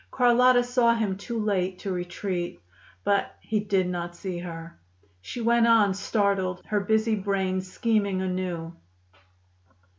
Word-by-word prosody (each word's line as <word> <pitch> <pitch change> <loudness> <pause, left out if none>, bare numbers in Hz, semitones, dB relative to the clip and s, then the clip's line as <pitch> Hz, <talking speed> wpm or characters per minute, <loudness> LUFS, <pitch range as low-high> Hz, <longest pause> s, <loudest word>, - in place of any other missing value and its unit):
Carlotta 250 0 +4
saw 245 -1 +3
him 215 -4 -1
too 230 +4 -5
late 190 -4 0
to 195 - -5
retreat. 175 - -3 0.4
But 200 0 +1
he 215 -1 -1
did 200 -3 +1
not 175 -1 -4
see 180 -1 -5
her. 165 - -8 0.4
She 240 - -6
went 235 0 +3
on, 215 -4 +5
startled, 195 -2 -1
her 210 - 0
busy 220 +2 +1
brain 190 -2 0
scheming 200 0 0
anew. 180 -3 -3
200 Hz, 130 wpm, -26 LUFS, 185-220 Hz, 0.4 s, on